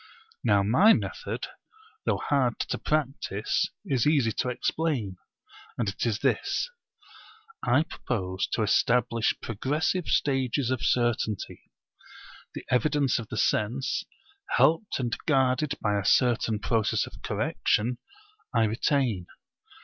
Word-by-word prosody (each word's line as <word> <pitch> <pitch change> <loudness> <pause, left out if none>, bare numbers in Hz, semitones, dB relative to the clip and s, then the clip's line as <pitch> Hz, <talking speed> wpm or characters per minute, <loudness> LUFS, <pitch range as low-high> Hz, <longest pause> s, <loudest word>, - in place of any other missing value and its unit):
Now 100 -4 +3
my 180 - +6
method, - - -3 0.6
though - - +1
hard 130 -5 +1
to - - -2
practise, 135 -9 -1 0.2
is 135 - +1
easy 140 -7 +3
to 125 - -2
explain; 125 - -1 0.6
and 120 - -1
it 100 - -2
is 110 -3 0
this. - - 0 0.9
I 130 +5 +3
propose 95 - -3
to 110 - +1
establish 115 +2 +2
progressive 150 - -1
stages 135 -2 +1
of 130 - -1
certainty. 120 -4 -1 0.9
The - - -7
evidence 135 +1 +2
of 115 - -7
the 110 - -5
sense, 120 +7 0 0.5
helped 165 +7 +3
and 120 -3 -1
guarded 135 0 +2
by 105 -1 0
a - - -3
certain 115 -2 +3
process 110 +1 0
of - - -13
correction, 120 +3 0 0.6
I 115 - +4
retain. 110 -3 0
125 Hz, 120 wpm, -27 LUFS, 110-140 Hz, 0.9 s, my